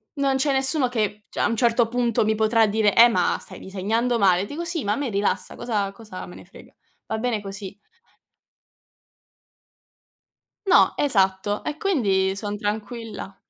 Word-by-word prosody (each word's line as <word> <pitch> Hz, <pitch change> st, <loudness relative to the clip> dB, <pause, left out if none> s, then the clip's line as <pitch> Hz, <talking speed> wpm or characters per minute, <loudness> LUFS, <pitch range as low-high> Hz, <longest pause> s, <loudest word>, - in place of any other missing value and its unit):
non 275 Hz, -1 st, +1 dB
c'è 275 Hz, +2 st, +1 dB
nessuno 265 Hz, 0 st, +1 dB
che 210 Hz, -3 st, -2 dB
cioè -, -, -7 dB
a -, -, +3 dB
un 230 Hz, -, -1 dB
certo 235 Hz, 0 st, +2 dB
punto 235 Hz, -2 st, 0 dB
mi 220 Hz, 0 st, +1 dB
potrà 220 Hz, 0 st, +3 dB
dire: 210 Hz, -1 st, +2 dB
"Eh 235 Hz, +1 st, +8 dB
ma 185 Hz, -7 st, +1 dB
stai -, -, -11 dB
disegnando 225 Hz, +5 st, -1 dB
male!" 190 Hz, -1 st, +3 dB
Dico: 330 Hz, +9 st, -6 dB
"Sì, 330 Hz, -4 st, -3 dB
ma 205 Hz, -, -1 dB
a -, -, -1 dB
me 280 Hz, -4 st, -2 dB
rilassa, 200 Hz, -2 st, -1 dB
cosa 210 Hz, -5 st, -2 dB
cosa 210 Hz, -4 st, -9 dB
me 180 Hz, -, -12 dB
ne -, -, -12 dB
frega?" 185 Hz, -, -17 dB, 0.3 s
Va 220 Hz, -, -3 dB
bene 235 Hz, -2 st, -1 dB
così. 195 Hz, 0 st, -8 dB, 2.9 s
No, 375 Hz, -, +5 dB
esatto, 200 Hz, -5 st, +1 dB
e 300 Hz, -, -3 dB
quindi 195 Hz, -, +1 dB
son 205 Hz, 0 st, -4 dB
tranquilla. 210 Hz, -1 st, -5 dB
220 Hz, 165 wpm, -23 LUFS, 200-245 Hz, 2.9 s, Eh